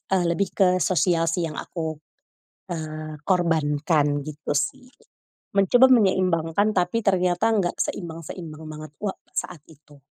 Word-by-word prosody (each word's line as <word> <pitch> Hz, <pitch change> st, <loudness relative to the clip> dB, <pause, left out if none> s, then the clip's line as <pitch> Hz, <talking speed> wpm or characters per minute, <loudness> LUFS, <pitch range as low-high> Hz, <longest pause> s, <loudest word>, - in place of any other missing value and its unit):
eee 185 Hz, -2 st, +3 dB
lebih 195 Hz, +3 st, 0 dB
ke 190 Hz, -3 st, +5 dB
sosial 170 Hz, -2 st, +2 dB
sih 170 Hz, 0 st, -1 dB
yang 155 Hz, -, -8 dB
aku, 160 Hz, -3 st, -5 dB, 0.7 s
eee, 155 Hz, -1 st, -5 dB
korbankan 150 Hz, -4 st, +1 dB
gitu 150 Hz, -1 st, -4 dB
sih, 255 Hz, -, -2 dB, 0.7 s
mencoba 240 Hz, +7 st, +6 dB
menyeimbangkan 185 Hz, -3 st, +2 dB
tapi 180 Hz, +5 st, +1 dB
ternyata 180 Hz, +1 st, +2 dB
nggak 185 Hz, -4 st, 0 dB
seimbang-seimbang 165 Hz, -1 st, -5 dB
banget 155 Hz, 0 st, -8 dB
wa 200 Hz, -2 st, -1 dB, 0.2 s
saat 170 Hz, -5 st, -4 dB
itu. 145 Hz, -2 st, -19 dB
165 Hz, 125 wpm, -24 LUFS, 155-185 Hz, 0.7 s, mencoba